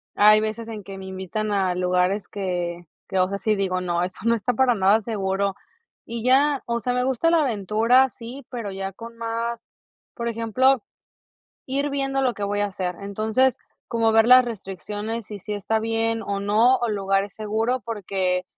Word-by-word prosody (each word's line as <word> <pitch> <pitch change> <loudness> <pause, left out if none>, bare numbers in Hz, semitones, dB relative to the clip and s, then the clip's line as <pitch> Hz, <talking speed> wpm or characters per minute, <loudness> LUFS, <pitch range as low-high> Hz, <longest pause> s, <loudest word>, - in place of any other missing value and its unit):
hay 215 +1 +6
veces 220 +1 -3
en 215 -3 -7
que 195 0 -9
me 190 - -8
invitan 190 +3 -3
a 190 -3 +1
lugares 180 +2 +1
que 175 -3 -3 0.2
que, 190 - -2
o 185 - +4
sea, 200 - -2
sí 215 0 +1
digo: 185 -2 -1
"No, 175 -1 0
eso 185 +1 -5
no 235 0 +4
está 230 +3 -1
para 250 0 +3
nada 200 +2 +4
seguro", 195 -2 -1 0.5
y 230 0 -5
ya, 275 +2 +4
o 235 0 0
sea, 250 +1 -1
me 250 0 +1
gusta 265 +6 +1
la 335 - +4
aventura, 230 +3 +3
sí, 240 +4 -10
pero 230 -6 -5
ya 195 0 -4
con 230 +3 -10
más 230 0 -3 0.5
por 235 - -3
ejemplo, 230 +2 +2 0.8
ir 280 +2 -1
viendo 270 -1 -1
lo 250 -2 +1
que 205 - -4
voy 205 +1 -1
a 205 - +2
hacer, 185 -2 -3
entonces, 220 +6 +1 0.3
como 230 -1 +2
ver 225 0 +5
las 255 0 +9
restricciones 210 +1 -5
y 210 - -6
si 210 +3 -6
está 205 +2 0
bien 225 0 0
o 200 0 -3
no, 220 +6 +4
o 240 - -1
el 215 - -1
lugar 195 0 +1
es 200 - -12
seguro, 220 +4 -1
porque 190 -4 -1
215 Hz, 195 wpm, -23 LUFS, 195-235 Hz, 0.8 s, las